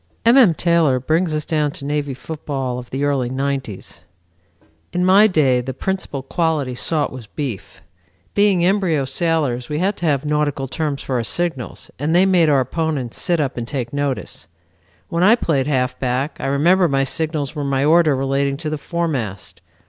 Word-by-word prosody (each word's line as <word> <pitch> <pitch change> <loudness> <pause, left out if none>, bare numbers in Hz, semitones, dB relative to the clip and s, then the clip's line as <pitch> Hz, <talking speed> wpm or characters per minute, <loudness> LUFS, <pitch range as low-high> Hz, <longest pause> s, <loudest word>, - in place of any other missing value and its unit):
M. 235 +2 +6
M. 225 -12 +6
Taylor 165 -7 +2
brings 160 +6 0
us 150 -1 -2
down 150 -2 0
to 140 - -8
Navy 145 -2 -2
football 135 -3 -4
of 125 - -11
the 135 +2 -3
early 140 -4 0
nineties. 135 -6 -4 0.9
"In 180 0 0
my 195 +3 +6
day 140 -10 +2
the 130 +1 -6
principal 185 -6 -3
quality 150 -3 -1
sought 150 +4 -1
was 125 -4 -9
beef. 130 -6 -6 0.5
Being 200 -4 +3
embryo 180 -7 +1
sailors 135 -4 -1
we 150 - -2
had 190 +5 0
to 175 - -2
have 145 -1 +1
nautical 150 -2 0
terms 145 +1 -3
for 130 - -1
our 120 - -1
signals, 160 0 -3
and 155 +4 0
they 185 +2 +5
made 180 -4 +4
our 140 -2 +4
opponents 140 -2 -3
sit 175 -2 +1
up 140 -4 -1
and 120 -1 -4
take 125 -3 -4
notice. 140 - -3 0.6
When 170 -1 -1
I 210 +6 +6
played 145 - 0
halfback 130 0 -1
I - - -3
remember 170 +7 +3
my 135 -2 +1
signals 150 0 -2
were 145 - -3
my 140 0 0
order 160 -2 +4
relating 135 +1 0
to 155 0 -4
the 155 - -3
foremast. 120 - -3
145 Hz, 180 wpm, -20 LUFS, 130-165 Hz, 0.9 s, M